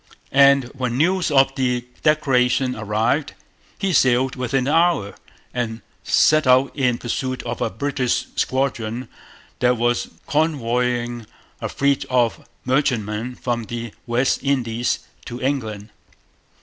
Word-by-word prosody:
And 140 0 +6
when 125 -3 -2
news 180 +4 +2
of 135 -2 +4
the 125 -2 -1 0.2
declaration 130 -4 +2
arrived, 110 +7 0 0.4
he 195 -2 -1
sailed 130 -2 +3
within 125 0 0
the 140 +4 0
hour, 165 - +2 0.4
and 115 -2 -3 0.2
set 155 -3 +3
out 130 +2 +4
in 125 -4 +1
pursuit 130 +2 -3
of 120 -1 -5
a - - +1
British 140 -4 -1
squadron 125 -3 -1 0.5
that 125 0 +3
was 120 +1 0 0.2
convoying 125 -6 0 0.3
a - - -3
fleet 140 -1 +1
of 120 -3 +1 0.2
merchantmen 125 -3 0
from 120 -2 -3
the 115 -1 -6
West 120 +3 +1
Indies 125 -4 -1 0.2
to 120 0 -6
England. 110 -6 -3
125 Hz, 125 wpm, -21 LUFS, 120-140 Hz, 0.5 s, And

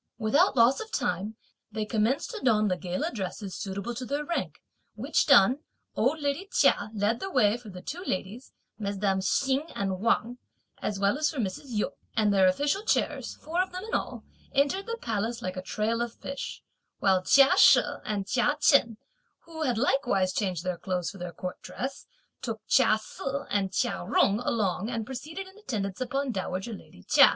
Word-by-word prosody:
Without 225 +5 +3
loss 235 +3 +5
of 445 0 -7
time, 210 +4 -1 0.4
they 215 0 -2
commenced 225 +4 0
to 450 - -6
don 215 -4 +3
the 185 - +1
gala 180 0 -3
dresses 195 -2 -5
suitable 200 +4 -4
to 245 - -5
their 285 +4 -2
rank; 340 - -3 0.4
which - - +1
done, 245 +8 +6 0.4
old 270 +8 +1
lady 290 +6 -2
Chia 205 - +3
led 210 +3 +1
the 385 - -4
way 210 - +3
for 240 -3 -10
the 180 -2 -10
two 355 +4 -5
ladies, 215 - -4 0.3
mesdames 200 -2 0
Hsing 275 +3 +1
and 190 -2 -2
Wang, 235 +3 +1 0.4
as 205 - -2
well 200 +8 +2
as 305 -1 +2
for 305 - -7
Mrs. 200 +2 -3
Yu; 220 -5 -1 0.2
and 215 -3 +3
their 190 -1 +5
official 285 - +1
chairs, 435 - 0
four 335 +3 -1
of 375 - -2
them 365 +1 -6
in 450 - -8
all, - - -2 0.3
entered 290 +9 +2
the 465 0 -3
palace 230 - -2
like 185 0 -3
a 185 - -4
trail 220 +4 -1
of 235 -1 -3
fish; 275 0 -6 0.3
while 190 -2 +3
Chia 270 +8 +6
She - - +8 0.2
and 205 -2 -2
Chia 260 +8 +1
Chen, 260 -7 +4 0.4
who 325 -1 -9
had 250 -7 +1
likewise 240 -8 +1
changed 185 -6 -1
their 180 -1 -2
clothes 180 -3 -2
for 200 - -12
their 175 0 -5
court 180 +2 -6
dress, 270 +2 -6 0.3
took 225 -3 -4
Chia 245 -4 +5
Se 215 - -11 0.3
and 195 -2 0
Chia 90 - -1
Jung 205 +2 +4
along 215 -4 -1
and 230 -3 -3
proceeded 310 - -6
in 380 +2 -16
attendance 205 - -4
upon 270 +2 -1
dowager 190 +2 -3
lady 90 - -13
Chia. - - +7
225 Hz, 185 wpm, -28 LUFS, 195-275 Hz, 0.4 s, She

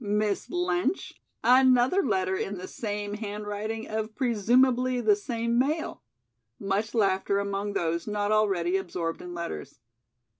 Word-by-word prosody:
Miss 210 -1 0
Lynch, 355 +1 -1 0.2
another 255 - +5
letter 190 - 0
in 195 +1 -3
the 185 +1 -7
same 205 -2 -4
handwriting 210 +1 -4
of 215 0 -3
presumably 250 +2 +2
the 215 -3 +4
same 235 +2 -1
male." 305 +5 -1 0.6
Much 200 +3 -2
laughter 200 -2 +2
among 200 0 -2
those 170 -1 -1
not 205 0 -1
already 195 -4 +2
absorbed 170 -3 -4
in 175 -1 -7
letters. 170 -6 -6
210 Hz, 125 wpm, -27 LUFS, 195-240 Hz, 0.6 s, another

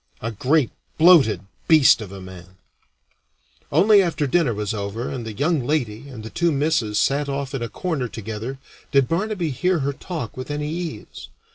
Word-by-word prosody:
A 115 - -4
great 130 +5 +1 0.3
bloated 160 -9 +6 0.3
beast 155 -7 +6
of 100 -3 -8
a 100 - -8
man! 95 0 -12 1.2
Only 200 +7 +6
after 170 -5 0
dinner 145 -1 +2
was 105 -1 -3
over 105 +3 -4
and 120 -4 -5
the - - -4
young 145 +4 0
lady 125 -2 -2
and 115 -5 -9
the 110 - -8
two 170 -1 +1
misses 140 -8 0
sat 140 +4 +1
off 140 0 -3
in 135 - -3
a 115 - -3
corner 160 -9 -2
together 110 +4 -6 0.3
did 140 -3 +4
Barnaby 180 -2 -1
hear 170 +6 0
her 140 - 0
talk 150 - -6
with 130 +2 -7
any 150 0 -3
ease. 165 -10 -6
135 Hz, 175 wpm, -22 LUFS, 110-160 Hz, 1.2 s, bloated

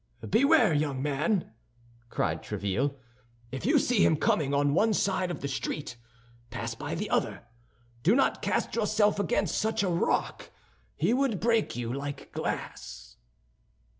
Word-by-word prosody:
"Beware, 280 - +4
young 145 -3 0
man!" 150 - 0 0.6
cried - - -1
Tréville. 120 +9 -2 0.6
"If 135 - -4
you 300 +3 +5
see 245 -6 +3
him 160 - +4
coming 145 -2 +1
on 140 0 +2
one 215 +6 +3
side 190 -2 0
of 175 - -5
the 140 - -2
street, 140 0 -4 0.5
pass - - -4
by - - -5
on - - -3
the - - -4
other. - - 0 0.6
Do 190 - +4
not 270 - +2
cast - - -1
yourself 210 -2 +2
against 195 -5 0
such 220 -1 0
a 190 - +1
rock; 170 -1 -1 0.5
he 175 +10 +1
would 255 -6 +1
break 230 -1 +1
you 120 0 -3
like 140 +1 -6
glass." - - -5
170 Hz, 150 wpm, -28 LUFS, 140-220 Hz, 0.6 s, you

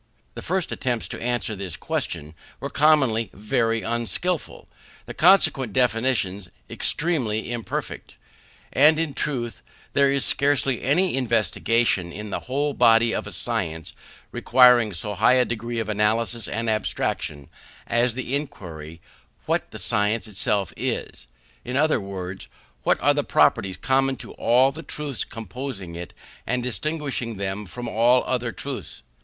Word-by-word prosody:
The - - -7
first 185 0 -1
attempts 120 -3 -2
to - - -6
answer 120 -2 -1
this 95 -4 -5
question 75 +1 -3 0.3
were - - -5
commonly 135 -7 +3
very 115 +2 0
unskilful, 120 +9 -2
and - - -28 0.4
the - - -7
consequent 155 - +4
definitions 115 -6 0 0.2
extremely 125 -10 0
imperfect. 120 -2 -5 0.6
And, 150 +3 +6
in 160 -3 -1
truth, 120 - -3 0.3
there 140 -1 +4
is 140 -1 +1
scarcely 140 -3 +2
any 175 +7 +2
investigation 115 -5 +1
in 105 +3 -7
the - - -2
whole 145 +2 0
body 115 -2 +4
of - - -3
a - - -7
science 90 -5 -3 0.4
requiring 125 -3 +5
so 105 +5 -2
high 110 +6 +4
a 125 -1 +4
degree 120 0 -4
of 115 - -2
analysis 110 +2 0
and 115 +1 -3
abstraction, 75 -9 -2 0.4
as 120 0 +1
the 130 0 -4
inquiry, 85 - -7 0.4
what - - -1
the - - -9
science 105 +2 0
itself 100 -3 0
is; 65 - -4 0.4
in 125 +2 -3
other 155 +2 +2
words, 95 -1 -6 0.3
what - - +2
are - - +5
the - - 0
properties 95 -1 +2
common 135 0 +1
to - - -9
all 125 +3 +3
the 155 +4 -8
truths 150 -3 -4
composing 115 -4 -7
it, 85 +1 -7 0.4
and 125 +1 0
distinguishing 135 -3 -2
them 100 +1 -4
from 120 +7 -7
all 120 +3 +3
other 125 -2 -1
truths. 130 - -7
120 Hz, 145 wpm, -24 LUFS, 105-135 Hz, 0.6 s, And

